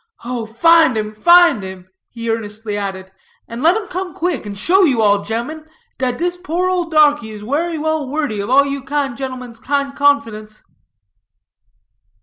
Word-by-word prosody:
Oh, 240 -2 -4
find 315 +3 +4
'em, 215 0 -3
find 345 - +5
'em," 190 -1 -9 0.2
he 230 -1 -4
earnestly 215 -1 -4
added, 190 -2 -5 0.4
"and 230 +1 -7
let 335 +7 +4
'em 440 - -4
come 370 0 -5
quick, 325 -11 -2
and 200 -1 -7
show 360 - +3
you 275 -10 +3
all, 205 -2 +3
ge'mmen, 240 +9 -5 0.3
dat 250 -2 -1
dis 355 +1 -2
poor 355 0 -2
ole 355 -2 -1
darkie 295 -6 +3
is 210 -1 -9
werry 315 +8 -1
well 310 -2 -2
wordy 290 -8 -2
of 200 +3 -4
all 275 +2 +5
you 280 0 -3
kind 275 -1 -2
ge'mmen's 255 -3 -7
kind 280 +1 -2
confidence." 225 -7 0
265 Hz, 165 wpm, -18 LUFS, 220-315 Hz, 0.4 s, find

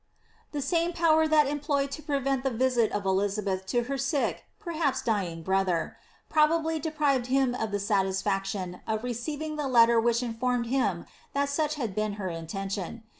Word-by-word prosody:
The 290 -2 -2
same 340 +2 +1
power 320 -2 +4
that 310 -1 +5
was 280 - -2
employed 285 -1 -1
to 305 - -5
prevent 275 -3 0
the 270 - +1
visit 245 -2 +2
of 205 -1 -2
Elizabeth 195 0 0
to 240 +5 +1
her 275 +3 -3
sick, 275 +1 -1
perhaps 320 -8 -1
dyiog, 180 -7 -1
brother, 190 -2 0 0.3
probably 320 +1 +2
deprived 290 -5 0
him 265 -1 +2
of 220 -3 -2
the 205 - -1
satis 195 -2 0
faction 195 -2 -2
of 220 0 -1
receiving 295 +6 -4
the 295 -2 -1
letter 235 -2 +5
which 235 +1 +2
informed 240 +1 -1
him 230 -9 0 0.3
that 280 0 +1
such 305 +1 0
had 230 -9 -3
been 215 +1 -1
her 200 -2 -4
intention. 195 +6 -5
245 Hz, 175 wpm, -28 LUFS, 200-290 Hz, 0.3 s, that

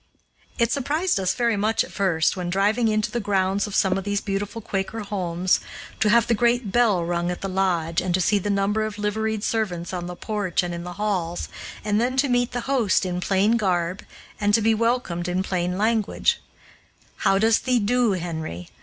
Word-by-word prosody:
It 235 -2 +2
surprised 300 - 0
us 185 -1 0
very 235 -2 +1
much 215 +2 +1
at - - -11
first, 175 -5 +1
when 180 -2 -3
driving 210 +6 +2
into 215 -1 0
the 240 - -1
grounds 200 -1 0
of 205 - -6
some 190 0 +2
of - - -6
these 205 +1 0
beautiful 205 +2 -3
Quaker 205 +1 -3
homes, 185 -3 0 0.4
to 215 - +3
have 235 +2 +5
the 235 - +1
great 235 -1 +1
bell 210 -7 +3
rung 175 0 -1
at 180 - -4
the 195 - -2
lodge, 180 -4 0
and 185 - -2
to - - 0
see 205 +3 +2
the 205 - -3
number 200 +2 +1
of 215 -1 -4
liveried 215 +1 -1
servants 185 -7 -2
on 175 -1 -4
the 180 - -6
porch 200 -3 -1
and 175 0 -3
in 170 0 -5
the 180 0 -6
halls, 185 -4 -2 0.4
and 210 +1 +2
then 255 +2 0
to 275 +1 +3
meet 245 0 +1
the 245 0 -3
host 235 -7 +1
in 180 -1 -2
plain 200 +5 +2
garb, 180 -3 -1 0.4
and 205 0 +3
to 225 - +2
be 225 +1 +4
welcomed 220 -7 0
in 180 +1 0
plain 180 -1 -1
language, 220 0 +1 0.8
"How 195 - +2
does 220 +2 +4
thee 255 -1 +1
do, 235 0 +2
Henry?" 160 - -5
200 Hz, 205 wpm, -24 LUFS, 180-225 Hz, 0.8 s, have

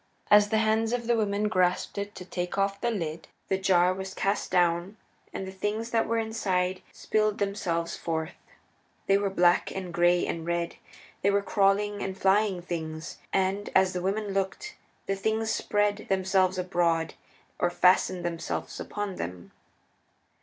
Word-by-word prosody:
As 210 0 +7
the 220 - +2
hands 220 +1 +2
of 240 -1 -1
the 235 0 +2
women 210 -1 0
grasped 180 -3 +1
it 200 +1 -5
to 180 - -8
take 180 0 -4
off 195 0 0
the 240 - +1
lid 165 -8 -4 0.2
the 190 - +2
jar 185 -1 +4
was 190 0 -6
cast 200 +1 -1
down, 175 +3 +1 0.3
and 190 - -5
the 190 - -6
things 210 +4 -3
that 225 -1 +2
were 230 - 0
inside 190 -5 -1
spilled 215 -1 0
themselves 185 -5 -1
forth. 160 +1 -3 0.7
They 195 0 +4
were 200 -1 0
black 175 -2 +3
and 185 -2 -6
gray 175 0 +3
and 165 - -3
red; 170 0 -2 0.4
they 200 - +3
were 200 0 +2
crawling 205 +1 +2
and 190 0 -4
flying 195 -2 +2
things. 160 -2 -5
And, 195 +2 0
as 190 -1 +4
the 180 - -2
women 200 +3 -1
looked, 195 - -2 0.3
the 195 - -1
things 220 +3 0
spread 205 0 0
themselves 190 -1 +2
abroad 175 -3 0 0.5
or 175 - +2
fastened 180 0 +3
themselves 170 -1 -4
upon 205 -2 -4
them. 90 +1 -6
190 Hz, 160 wpm, -28 LUFS, 175-205 Hz, 0.7 s, As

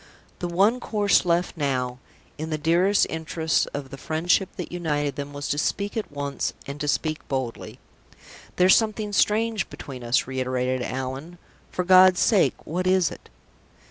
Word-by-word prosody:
The 175 - -2
one 200 +8 +2
course 205 -5 +2
left 175 +1 +1
now, 130 -5 -1 0.4
in 160 +1 -4
the 155 - -1
dearest 175 +6 +3
interests 160 -1 -1
of 140 -2 -6
the 135 - -8
friendship 175 +4 +1
that 180 - -6
united 150 -5 -1
them, 145 0 -5
was 145 0 -5
to 145 - 0
speak 200 +6 -1
at 220 -7 -3
once, 140 -1 -3
and 140 +1 -7
to 150 - -2
speak 155 +1 0
boldly. 130 -4 -4 0.8
"There's 180 +1 +6
something 215 -2 0
strange 215 +1 +1
between 130 -3 -9
us," 120 +1 +2
reiterated 130 -1 -1
Allan. 130 +7 -5 0.3
"For 180 - -2
God's 185 0 +7
sake, 210 -6 +3
what 180 +3 -2
is 185 -3 +3
it?" - - -12
160 Hz, 160 wpm, -24 LUFS, 140-185 Hz, 0.8 s, God's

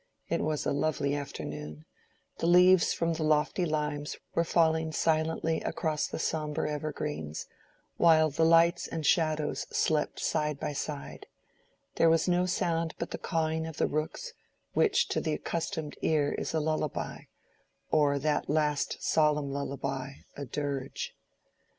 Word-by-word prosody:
It - - 0
was 155 -1 -1
a - - +1
lovely 140 -1 0
afternoon; 75 - -6 0.5
the 165 - 0
leaves 180 +1 +6
from 165 0 0
the 160 - -4
lofty 155 +4 +2
limes 150 -1 -2 0.2
were 170 - +2
falling 160 -1 +2
silently 160 +1 +1
across 155 -2 -1
the - - -5
sombre 155 -1 -1
evergreens, 150 - -4 0.5
while 160 -2 +5
the 155 +4 +1
lights 165 +1 +4
and 160 -2 -4
shadows 155 -1 +1
slept 155 -2 0
side 150 -2 -1
by 150 -1 -3
side: 145 0 -5 0.7
there 165 - +5
was 165 +1 +3
no 180 0 +2
sound 165 -3 0
but 170 - -4
the - - -4
cawing 160 -1 -1
of 160 - -8
the - - +2
rooks, 155 +1 -3 0.4
which - - +3
to - - 0
the 155 - -1
accustomed 160 -1 -3
ear 150 -2 +2
is - - -3
a - - +3
lullaby, 155 -1 -2 0.7
or 145 -2 +3
that 150 +2 0
last 150 -1 0
solemn 150 -2 +2
lullaby, 135 -1 -3 0.2
a 140 - -5
dirge. 140 0 -4
155 Hz, 145 wpm, -29 LUFS, 145-160 Hz, 0.7 s, leaves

